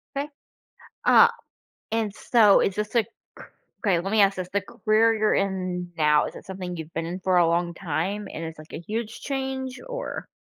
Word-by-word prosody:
'Kay, 285 +2 -2 0.8
uh, - - +7 0.6
and 220 -3 -1
so 220 -5 +5
is 195 - 0
this 210 +3 -3
a 230 - +5
c - - -21 0.8
okay, 180 -4 +3
let 195 +4 -4
me 215 -1 +4
ask 195 -1 +3
this, 180 -1 -4
the 200 - +1
career 220 +2 +2
you're 215 -1 +2
in 185 -2 -2
now, 150 -1 +4
is - - -7
it - - -11
something 185 -2 -6
you've 160 0 -8
been 165 0 -2
in 180 +3 -5
for 185 0 +2
a 170 -1 +5
long 170 +1 0
time 190 +4 -3
and 165 - -5
it's, 160 -1 -7
like, 155 - -13
a - - -5
huge 220 +5 -5
change? 265 -1 -3
Or - - -5
195 Hz, 200 wpm, -25 LUFS, 175-220 Hz, 0.8 s, uh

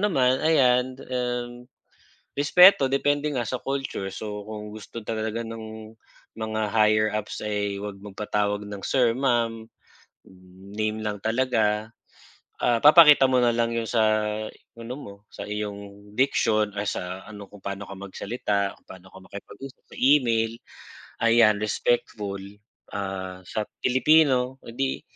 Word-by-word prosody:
naman 130 -11 +2
ayan, 130 -5 +3
um, 125 -1 -3 0.7
respeto 145 0 +6
depende 145 +2 +1
nga 125 -3 -1
sa 130 - -3
culture 135 -7 -3
so, 105 -1 -6
kung 105 -1 -7
gusto 110 +2 -9
talaga 110 +1 -3
ng 110 -1 -9 0.4
mga 110 0 -3
higher 110 -1 +4
ups 105 0 -4
ay 105 -1 -2
huwag 100 -1 -7
magpatawag 105 0 -2
ng 100 -1 -7
Sir, 125 -3 +3
Ma'am, 115 -4 0 1.1
name 110 0 -1
lang 105 -1 -3
talaga. 110 -2 0 0.7
Ah, 120 -1 +2
papakita 150 -2 +8
mo 130 -1 +3
na 120 - +4
lang 115 0 +1
'yong 115 -1 -2
sa 115 -2 +2 0.7
ano 115 +2 -7
mo 100 - -9 0.2
sa - - -7
iyong 100 -1 -6
diction 110 -4 +2
ay 100 - -1
sa 90 +1 -5
ano 105 -2 -10
kung 105 - -13
paano 100 +1 -5
ka 95 - -7
magsalita, 100 0 -3
kung - - -37
paano 95 0 -12
ka 95 - -13
makipag-usap 130 +8 -11
sa - - -13
email 115 -5 +3 0.7
ayan 115 -2 +5
respectful. 105 -2 -1 0.5
Ah, 95 -2 -5
sa 110 - -2 0.2
Pilipino 130 -1 +3
'di 130 +3 -3
110 Hz, 135 wpm, -25 LUFS, 105-125 Hz, 1.1 s, papakita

